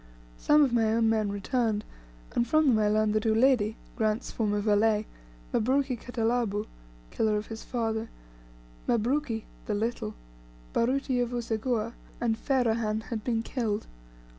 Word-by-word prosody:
Some 295 Hz, 0 st, +5 dB
of 260 Hz, -4 st, +1 dB
my 225 Hz, -2 st, +3 dB
own 225 Hz, -1 st, +3 dB
men 215 Hz, -2 st, +1 dB
returned, 215 Hz, +1 st, 0 dB, 0.5 s
and 240 Hz, -, +1 dB
from 310 Hz, +2 st, +4 dB
them 225 Hz, -4 st, +4 dB
I 210 Hz, -, +3 dB
learned 215 Hz, 0 st, +2 dB
that 215 Hz, 0 st, +1 dB
Uledi, 220 Hz, -1 st, +3 dB, 0.2 s
Grant's 220 Hz, 0 st, 0 dB
former 210 Hz, -2 st, 0 dB
valet, 210 Hz, +1 st, +3 dB, 0.5 s
Mabruki 260 Hz, +3 st, +2 dB
Khatalabu 230 Hz, -3 st, -1 dB, 0.5 s
(Killer 215 Hz, -1 st, +1 dB
of 210 Hz, -, -3 dB
his 225 Hz, 0 st, -7 dB
father), 225 Hz, -2 st, -2 dB, 0.8 s
Mabruki 240 Hz, 0 st, +1 dB, 0.2 s
(the 210 Hz, -, 0 dB
Little), 215 Hz, -, -2 dB, 0.6 s
Baruti 255 Hz, +1 st, +1 dB
of 245 Hz, -1 st, +1 dB
Useguhha, 230 Hz, -1 st, -1 dB, 0.3 s
and 230 Hz, -2 st, +1 dB
Ferahan 225 Hz, -4 st, +1 dB
had 220 Hz, -2 st, -3 dB
been 225 Hz, -2 st, 0 dB
killed. 225 Hz, -4 st, -2 dB
225 Hz, 140 wpm, -28 LUFS, 215-245 Hz, 0.8 s, Some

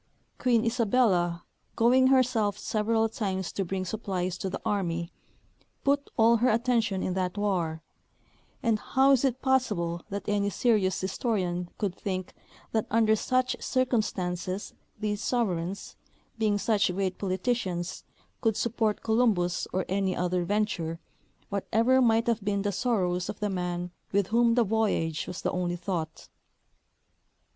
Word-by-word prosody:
Queen 235 Hz, -3 st, +2 dB
Isabella, 215 Hz, -7 st, +2 dB, 0.3 s
going 250 Hz, +3 st, +5 dB
herself 245 Hz, -6 st, +3 dB
several 220 Hz, +1 st, +1 dB
times 190 Hz, -4 st, -3 dB
to 195 Hz, -, -2 dB
bring 185 Hz, +1 st, -3 dB
supplies 185 Hz, -3 st, -2 dB
to 190 Hz, -, -2 dB
the 190 Hz, -, -4 dB
army, 170 Hz, -4 st, -1 dB, 0.7 s
put 280 Hz, 0 st, +1 dB
all 230 Hz, +1 st, +5 dB
her 245 Hz, +3 st, +3 dB
attention 225 Hz, -4 st, +1 dB
in 185 Hz, -, -1 dB
that 185 Hz, +1 st, -2 dB
war; 175 Hz, -6 st, -1 dB, 0.8 s
and 225 Hz, -3 st, +2 dB
how 270 Hz, +4 st, +3 dB
is 270 Hz, -2 st, +4 dB
it 260 Hz, -1 st, 0 dB
possible 205 Hz, -11 st, +1 dB
that 200 Hz, -1 st, -5 dB
any 205 Hz, -1 st, +1 dB
serious 205 Hz, -3 st, +2 dB
historian 185 Hz, -3 st, -1 dB
could 200 Hz, -4 st, -1 dB
think 185 Hz, -1 st, -4 dB, 0.4 s
that 220 Hz, -1 st, 0 dB
under 220 Hz, 0 st, +4 dB
such 255 Hz, +3 st, 0 dB
circumstances 200 Hz, -7 st, -1 dB, 0.3 s
these 210 Hz, -1 st, -2 dB
sovereigns, 195 Hz, -6 st, -2 dB, 0.4 s
being 210 Hz, -2 st, +2 dB
such 205 Hz, -2 st, +2 dB
great 190 Hz, -1 st, -2 dB
politicians, 185 Hz, -2 st, -2 dB, 0.4 s
could 225 Hz, -3 st, +1 dB
support 225 Hz, -2 st, 0 dB
Colum 225 Hz, 0 st, +3 dB
bus 175 Hz, 0 st, -1 dB
or 185 Hz, 0 st, -1 dB
any 190 Hz, 0 st, 0 dB
other 180 Hz, 0 st, 0 dB
venture, 180 Hz, -5 st, -1 dB, 0.5 s
whatever 225 Hz, +6 st, +2 dB
might 230 Hz, -1 st, +3 dB
have 230 Hz, -3 st, 0 dB
been 200 Hz, -1 st, 0 dB
the 205 Hz, -, 0 dB
sorrows 185 Hz, -5 st, 0 dB
of -, -, -5 dB
the 210 Hz, -1 st, -1 dB
man 180 Hz, -1 st, -3 dB, 0.2 s
with 200 Hz, -1 st, +1 dB
whom 235 Hz, +1 st, +3 dB
the 240 Hz, -, +4 dB
voyage 200 Hz, -7 st, 0 dB
was 180 Hz, -, -6 dB
the -, -, 0 dB
only 175 Hz, -1 st, -1 dB
thought? 170 Hz, -3 st, -4 dB
205 Hz, 140 wpm, -28 LUFS, 180-230 Hz, 0.8 s, going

